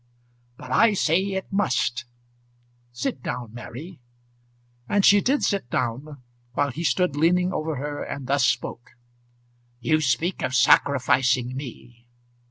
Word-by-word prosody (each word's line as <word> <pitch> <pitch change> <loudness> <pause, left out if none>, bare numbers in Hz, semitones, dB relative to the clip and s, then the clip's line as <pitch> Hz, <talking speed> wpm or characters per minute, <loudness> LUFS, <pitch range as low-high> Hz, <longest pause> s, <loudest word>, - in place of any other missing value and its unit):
"But 130 - -10
I 225 - +4
say 170 0 +2
it 195 0 -4
must. 130 -10 0 0.9
Sit 125 +1 -4
down, 120 -3 -5
Mary." 130 +8 -9 0.9
And 205 -1 +3
she 205 0 +6
did 275 +6 +1
sit 200 - -1
down, 130 +4 -3 0.3
while 145 +1 0
he 165 +7 -5
stood 180 -2 +1
leaning 180 +4 +2
over 155 0 -2
her 145 +2 -5
and 140 -2 -6
thus 140 +1 +1
spoke. 120 0 -2 0.9
"You 155 +5 +1
speak 150 +7 0
of 130 - -1
sacrificing 130 -1 +3
me. 120 -3 -10
140 Hz, 130 wpm, -24 LUFS, 125-175 Hz, 0.9 s, she